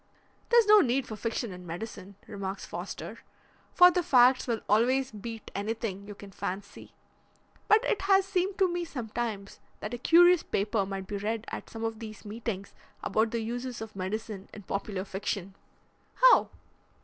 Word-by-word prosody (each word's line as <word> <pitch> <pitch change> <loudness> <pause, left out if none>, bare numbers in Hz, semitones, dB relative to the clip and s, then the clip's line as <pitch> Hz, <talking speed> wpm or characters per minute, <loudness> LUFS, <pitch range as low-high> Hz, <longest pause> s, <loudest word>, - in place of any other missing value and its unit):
"There's 475 -1 +6
no 420 0 +8
need 265 -1 +1
for 215 - -6
fiction 230 +1 -3
in 180 0 -10
medicine," 195 +2 -7
remarks 195 -2 -5
Foster, - - -7 0.5
"for 360 0 +8
the 360 - +1
facts 255 -4 +5
will 230 -3 -1
always 255 +5 +3
beat 225 +1 -8
anything 205 -1 -4
you 205 - -8
can 200 0 -12
fancy. 195 +2 -6 0.7
But 430 +1 +5
it - - 0
has 390 -1 +4
seemed 380 0 -1
to 385 - +4
me 350 0 -2
sometimes 225 - -5 0.2
that 210 - -5
a 245 - -4
curious 350 +5 +6
paper 200 0 -1
might 195 -1 -5
be 205 - -4
read 215 +2 -3
at - - -7
some 225 0 -7
of 225 -1 -3
these 215 -1 -9
meetings 210 -2 -5 0.3
about 220 +1 +1
the 230 0 -2
uses 245 +2 -4
of 220 -1 -8
medicine 200 +1 -5
in 210 - -10
popular 195 0 -3
fiction." 195 -1 -4 0.6
"How?" - - +6
225 Hz, 165 wpm, -29 LUFS, 200-260 Hz, 0.7 s, no